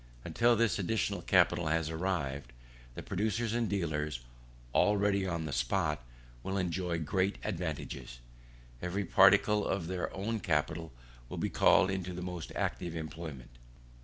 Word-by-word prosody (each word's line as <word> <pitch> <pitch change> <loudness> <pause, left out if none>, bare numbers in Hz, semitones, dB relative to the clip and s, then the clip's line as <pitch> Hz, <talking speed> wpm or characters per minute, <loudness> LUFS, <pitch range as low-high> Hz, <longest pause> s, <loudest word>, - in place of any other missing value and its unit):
Until 120 0 +3
this 115 -2 +2
additional 100 +3 0
capital 85 - +3
has 80 0 0
arrived, 75 -7 -2 0.4
the - - -6
producers 110 +3 -1
and 120 -2 0
dealers 75 -8 -1 0.5
already 100 -1 +3
on 85 -3 -2
the 75 - -4
spot 80 -8 0 0.4
will 95 +6 -2
enjoy 90 -1 -1
great 95 +5 0
advantages. 80 - -4 0.6
Every 95 +3 -2
particle 100 +3 +5
of 95 -4 -1
their 90 +1 -3
own 110 +4 -2
capital 80 -1 -1 0.4
will - - -6
be - - -1
called 95 - +5
into 90 -1 -3
the 90 0 -5
most 90 -3 -5
active 85 -2 -2
employment. 80 -5 -7
90 Hz, 135 wpm, -32 LUFS, 80-100 Hz, 0.6 s, particle